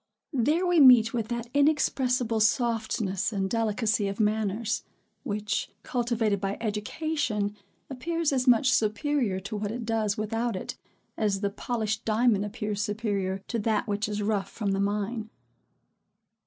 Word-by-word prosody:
There 295 +8 +2
we 355 -2 +3
meet 245 -5 +7
with 230 -3 -1
that 235 0 -3
inexpressible 260 -5 +2
softness 220 -3 +1
and 195 -2 -1
delicacy 220 -1 0
of 195 +2 -4
manners, 215 +1 0 0.4
which, 210 -4 -2
cultivated 230 -5 0
by 195 0 -2
education, 215 0 -2 0.3
appears 320 +3 -1
as 255 -1 0
much 250 +1 +5
superior 225 -2 +1
to 200 +3 -6
what 205 0 -2
it 235 +2 -4
does 220 -2 0
without 225 +1 -1
it, 185 - -5 0.4
as 205 -3 0
the 200 -1 0
polished 220 0 -2
diamond 220 -2 +2
appears 210 -1 -3
superior 200 -3 -2
to 235 - -1
that 215 0 0
which 210 +1 -1
is 210 0 -2
rough 205 -2 0
from 205 -3 -2
the 195 - 0
mine. 210 +3 -2
220 Hz, 140 wpm, -27 LUFS, 205-240 Hz, 0.4 s, meet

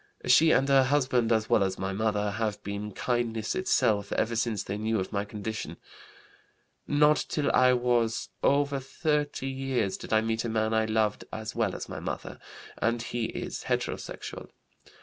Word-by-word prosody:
She 160 +1 +6
and 135 -3 +4
her 135 -1 +5
husband 130 -4 +2
as 110 -1 +2
well 110 - +3
as 95 -1 -1
my 95 +1 -3
mother 105 0 0
have 105 -1 -2
been 100 +1 -4
kindness 115 0 -1
itself 110 - +1
ever 115 +1 0
since 115 -3 0
they 100 - -4
knew 110 0 0
of 95 - -4
my 100 0 -1
condition. 105 +1 -5 1.1
Not 150 +1 +4
till 145 -2 0
I 130 0 +5
was 120 -2 +1
over 140 0 +2
30 145 +1 -1
years 130 -6 -1
did - - -9
I 110 0 +4
meet 115 0 -1
a 120 - -2
man 110 0 0
I 110 0 +3
loved 110 -1 0
as 110 0 -5
well - - 0
as - - -6
my - - -6
mother, - - -5 0.4
and 115 +1 +1
he 120 -1 -2
is - - -5
heterosexual. - - -4
115 Hz, 170 wpm, -28 LUFS, 110-130 Hz, 1.1 s, She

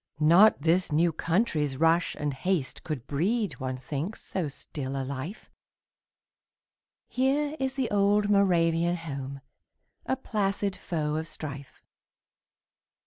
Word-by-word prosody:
Not 175 +8 +6
this 170 +2 +2
new 165 +3 +3
country's 160 - 0
rush 165 +3 +3
and 145 -1 -2
haste 150 +1 -2
Could 150 -7 -4
breed, 200 +9 -1
one 130 0 -3
thinks, 150 +10 -4
so 180 -5 -2
still 135 -1 -5
a 135 - -2
life; 140 - -6 1.6
Here 285 +3 +1
is 265 0 -1
the 265 -4 -1
old 205 0 +3
Moravian 175 -4 +3
home, 140 -5 -6 0.7
A - - +1
placid 200 -5 -1
foe 155 -3 -2
of 160 +1 -3
strife. 140 -4 -7
165 Hz, 120 wpm, -28 LUFS, 145-200 Hz, 1.6 s, Not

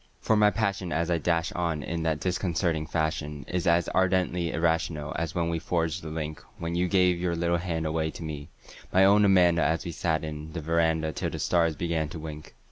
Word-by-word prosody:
For 110 - +2
my 105 -1 +5
passion 100 -5 -1
as 85 +1 0
I 85 - +2
dash 85 +1 0
on 85 -4 -2
in 85 +3 -3
that 80 -2 0
disconcerting 85 -3 -1
fashion 80 -2 -2
Is 90 +1 -2
as 85 0 +3
ardently 90 -2 +1
irrational 80 -2 0
as 80 -1 -3
when 85 -1 0
we 85 -1 -1
forged 85 0 -1
the 80 - -7
link 75 -1 -5 0.2
When 85 0 -4
you 90 +1 +1
gave 90 -1 +3
your 85 -1 -1
little 85 +1 +1
hand 85 -2 -2
away 80 0 0
to 85 - -8
me, 75 -2 -6 0.4
my 95 +1 +5
own 100 +2 +6
Amanda 90 -3 +5
An 80 - +2
we 85 - -3
sat 80 -1 -1
'n 75 0 -6
the 85 - -3
veranda 80 0 +1
till - - -3
the - - -5
stars 85 -3 +1
began 80 -2 -1
to 85 - -7
wink. 75 -3 -9
85 Hz, 210 wpm, -27 LUFS, 80-90 Hz, 0.4 s, own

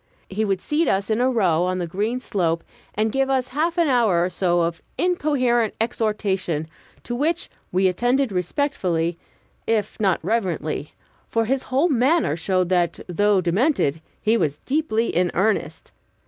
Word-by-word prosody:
He 210 +3 -1
would 195 -3 0
seat 310 +2 0
us 195 +2 0
in 220 +2 +1
a 255 - +3
row 185 -10 +2
on 185 0 -1
the 180 - -2
green 210 +8 -2
slope, 170 -8 -1 0.3
and 215 +1 +1
give 270 +2 +1
us 260 -1 0
a - - -19
half 325 +6 0
hour 240 - +3
or 185 - -3
so 175 -1 +1
of 170 0 -2 0.2
incoherent 255 - +1
exhortation, 205 -8 -1 0.4
to 240 - -5
which 310 +7 -1 0.2
we 185 +1 +3
attended 245 +7 +1
respectfully, 180 - -1 0.5
if 215 -2 -1
not 195 -4 +2
reverently; 175 -9 -2 0.3
for 225 0 +1
his 265 +3 0
whole 270 +7 +1
manner 275 - +2
showed 185 +1 0
that, 175 -2 +1
though 200 +2 +2
demented, 175 - +1 0.2
he 220 +2 +2
was 150 -8 0
deeply 260 -6 0
in 180 +1 +2
earnest. 210 +3 -1
215 Hz, 160 wpm, -23 LUFS, 180-255 Hz, 0.5 s, a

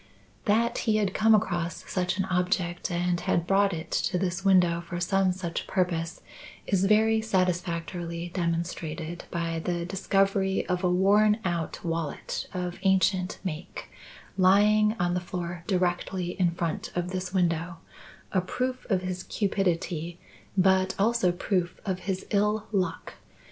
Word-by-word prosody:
That 230 +3 +2
he 215 - +4
had 205 -3 +1
come 220 0 +5
across 175 -4 -1
such 180 0 -1
an 190 - 0
object 180 -1 0
and 175 0 0
had 170 -1 0
brought 195 +1 +3
it 165 -1 -6
to 180 - 0
this 185 +1 -2
window 180 -3 +4
for 175 0 -5
some 190 +1 +2
such 180 -2 -4
purpose 175 -2 -1 0.4
is 195 -1 +1
very 220 +2 +4
satisfactorily 175 -3 -1
demonstrated 170 -1 -3
by 165 -1 -2
the 170 +1 -2
discovery 195 +1 +1
of 180 0 -1
a 180 - +3
worn 205 +4 +4
out 170 -2 -2
wallet 165 -3 -3
of 180 -2 -4
ancient 190 0 +2
make 165 -4 -6 0.5
lying 210 +3 +5
on 175 0 +1
the 180 - +1
floor 175 -1 -5
directly 180 -1 0
in 180 -2 +1
front 170 -1 -3
of 175 +1 -2
this 185 0 -3
window 170 -2 0 0.5
a 185 - +2
proof 255 +7 -3
of 185 -3 +1
his 185 0 -3
cupidity 175 -5 -1 0.4
but 190 0 +3
also 215 -2 +3
proof 180 0 -1
of 190 -2 -1
his 190 -1 -3
ill 210 +1 +1
luck. 185 -5 -2
180 Hz, 145 wpm, -27 LUFS, 175-195 Hz, 0.5 s, come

